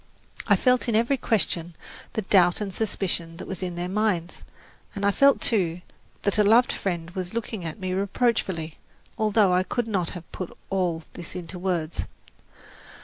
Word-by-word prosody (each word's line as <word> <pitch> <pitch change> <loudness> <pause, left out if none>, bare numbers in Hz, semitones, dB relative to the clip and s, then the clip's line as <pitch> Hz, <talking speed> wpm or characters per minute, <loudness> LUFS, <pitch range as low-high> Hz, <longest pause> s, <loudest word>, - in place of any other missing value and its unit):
I - - +6
felt 250 -1 +2
in 225 - +1
every 235 +5 +3
question 175 -8 0 0.4
the 220 - -1
doubt 180 -2 +4
and 200 -3 -4
suspicion 180 -6 -2
that - - -8
was 190 -1 -5
in 180 -2 -3
their 175 +1 -3
minds, 185 -3 -1 0.5
and 200 0 -2
I 200 - +5
felt, 280 +6 +5
too, 180 -6 +1 0.4
that 200 +1 +1
a - - +6
loved 230 +4 +5
friend 175 -3 -3
was 185 +2 -4
looking 220 -4 -3
at 160 - -5
me 185 -1 -2
reproachfully, 190 -5 0 0.4
although 215 -3 +4
I 180 - +4
could 225 +5 -2
not 185 -6 0
have 170 - -13
put 185 - -6
all 175 -4 0
this 170 0 -7
into 180 0 -6
words. 175 -3 -1
190 Hz, 170 wpm, -25 LUFS, 175-215 Hz, 0.5 s, I